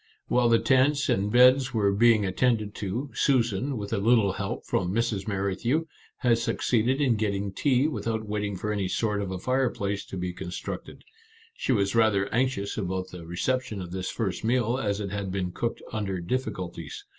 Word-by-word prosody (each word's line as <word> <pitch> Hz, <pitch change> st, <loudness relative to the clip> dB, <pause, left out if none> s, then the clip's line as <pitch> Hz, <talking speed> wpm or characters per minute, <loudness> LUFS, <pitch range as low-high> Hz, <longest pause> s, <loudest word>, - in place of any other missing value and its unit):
While 125 Hz, -1 st, +3 dB
the 115 Hz, -, +6 dB
tents 130 Hz, +5 st, +3 dB
and 100 Hz, +2 st, +1 dB
beds 125 Hz, +2 st, +5 dB
were 100 Hz, -2 st, +3 dB
being 110 Hz, 0 st, +4 dB
attended 105 Hz, +1 st, +1 dB
to, 115 Hz, +9 st, -4 dB
Susan, 125 Hz, 0 st, +1 dB
with 100 Hz, +1 st, -5 dB
a 105 Hz, -, +1 dB
little 110 Hz, -2 st, +3 dB
help 100 Hz, -1 st, -4 dB
from 90 Hz, -1 st, 0 dB
Mrs. 110 Hz, -2 st, -1 dB
Merrithew, 105 Hz, +10 st, 0 dB, 0.3 s
had 120 Hz, -2 st, +2 dB
succeeded 120 Hz, +3 st, +1 dB
in 130 Hz, -6 st, +2 dB
getting 100 Hz, -2 st, -1 dB
tea 135 Hz, +4 st, +2 dB
without 115 Hz, -7 st, -2 dB
waiting 105 Hz, -1 st, -2 dB
for 105 Hz, +3 st, -2 dB
any 100 Hz, -3 st, -1 dB
sort 105 Hz, +1 st, 0 dB
of 100 Hz, -, -3 dB
a 95 Hz, -, -3 dB
fireplace 115 Hz, -3 st, -1 dB
to 95 Hz, -, -6 dB
be 90 Hz, 0 st, -3 dB
constructed. 90 Hz, 0 st, -7 dB, 0.5 s
She 135 Hz, -, -2 dB
was 100 Hz, -5 st, +2 dB
rather 110 Hz, -4 st, +3 dB
anxious 115 Hz, -5 st, 0 dB
about 95 Hz, -1 st, -3 dB
the 85 Hz, -2 st, -10 dB
reception 110 Hz, +5 st, -1 dB
of 90 Hz, -2 st, -7 dB
this 95 Hz, 0 st, -3 dB
first 100 Hz, -4 st, -3 dB
meal, 120 Hz, +1 st, +1 dB
as 100 Hz, -4 st, -1 dB
it 100 Hz, -2 st, -4 dB
had 100 Hz, -2 st, -3 dB
been 90 Hz, -2 st, -2 dB
cooked 120 Hz, +6 st, -3 dB
under 100 Hz, -4 st, -2 dB
difficulties. 90 Hz, -, -4 dB
105 Hz, 180 wpm, -27 LUFS, 95-120 Hz, 0.5 s, the